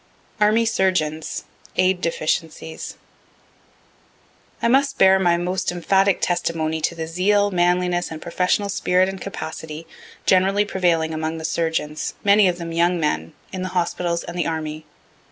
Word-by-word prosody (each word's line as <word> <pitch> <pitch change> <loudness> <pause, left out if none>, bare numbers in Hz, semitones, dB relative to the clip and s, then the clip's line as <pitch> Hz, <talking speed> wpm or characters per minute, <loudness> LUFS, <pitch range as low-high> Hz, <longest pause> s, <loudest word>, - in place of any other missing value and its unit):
ARMY 215 +2 +4
SURGEONS 170 -8 0 0.3
AID 185 0 +2
DEFICIENCIES 160 -1 -3 1.6
I - - +1
must 275 +3 +2
bear 190 0 +6
my 175 -2 +3
most 180 +2 -1
emphatic 190 +2 +2
testimony 160 -2 -1
to 170 - -1
the 165 -1 -4
zeal, 200 +5 +2
manliness, 180 0 +1
and 160 - -7
professional 180 +4 0
spirit 185 -1 +2
and 195 -1 -6
capacity, 160 -3 -6 0.4
generally 195 +2 +3
prevailing 170 -5 +1
among 160 +1 -3
the 160 - -5
surgeons, 160 -2 -2
many 200 0 +5
of 175 -1 0
them 170 -1 -6
young 170 +1 +2
men, 85 - -1 0.2
in 185 - -4
the 185 - -3
hospitals 170 -1 -1
and 175 - -8
the 175 - -1
army. 155 -1 -4
175 Hz, 140 wpm, -22 LUFS, 160-190 Hz, 1.6 s, bear